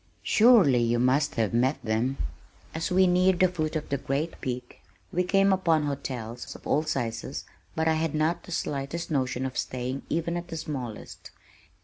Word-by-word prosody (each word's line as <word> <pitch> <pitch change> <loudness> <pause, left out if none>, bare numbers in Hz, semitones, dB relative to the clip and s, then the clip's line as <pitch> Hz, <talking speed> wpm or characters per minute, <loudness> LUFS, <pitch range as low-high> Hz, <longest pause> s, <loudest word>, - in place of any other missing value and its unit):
"Surely 210 - +6
you 120 0 +2
must 135 +5 +2
have 110 -3 0
met 130 +5 +2
them." 115 +4 0 0.6
As 160 +1 -2
we 185 +1 +4
neared 180 0 +3
the 185 - +6
foot 160 -3 -3
of 155 - -3
the 140 - -1
great 145 +5 -3
peak 125 -2 -5 0.3
we 180 - +2
came 195 +1 +3
upon 165 -5 +2
hotels 125 -5 -5
of - - -13
all 150 - +2
sizes 120 -7 -3 0.3
but 160 0 0
I 160 - +4
had 160 -1 -1
not 160 +3 +1
the - - -10
slightest 150 +2 -3
notion 130 -2 0
of 130 -1 -3
staying 130 +2 -3
even 170 +1 -1
at 175 0 -6
the 165 - -6
smallest. 130 -8 -6
150 Hz, 175 wpm, -27 LUFS, 125-170 Hz, 0.6 s, Surely